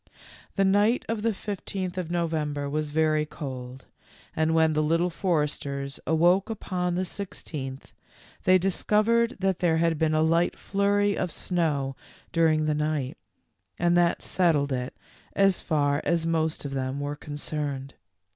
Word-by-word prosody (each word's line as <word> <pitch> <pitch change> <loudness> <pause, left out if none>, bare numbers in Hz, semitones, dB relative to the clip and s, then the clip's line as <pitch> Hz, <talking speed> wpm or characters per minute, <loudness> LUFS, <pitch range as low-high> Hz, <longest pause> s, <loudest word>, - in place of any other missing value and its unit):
The 195 - +3
night 205 +5 +3
of 225 -1 -2
the 230 +1 +2
fifteenth 195 -2 -4
of 180 -3 -3
November 155 -4 -1
was 150 +1 -2
very 155 0 +2
cold, 130 -4 -7 0.5
and 160 0 +2
when 160 -1 +4
the 155 - +2
Little 165 +3 +1
Foresters 145 -6 -2
awoke 175 +6 +3
upon 180 -5 -2
the 185 +1 0
sixteenth, 150 -8 -6 0.5
they 185 0 +6
discovered 215 +5 +2
that 190 -1 0
there 170 -3 +2
had 165 -1 +1
been 155 -1 +2
a 155 - +3
light 165 +2 +2
flurry 200 +1 +1
of 180 - -1
snow 150 -7 -1 0.4
during 160 -2 +3
the 155 - +1
night, 150 -3 -1 0.6
and 175 0 +2
that 175 -1 +2
settled 155 -6 +2
it 125 0 -4 0.4
as 195 -2 +3
far 145 -2 +1
as 170 -1 +1
most 160 -2 0
of 140 - -4
them 135 +1 -2
were 145 +1 -3
concerned. 145 -2 -4
160 Hz, 145 wpm, -26 LUFS, 150-185 Hz, 0.6 s, they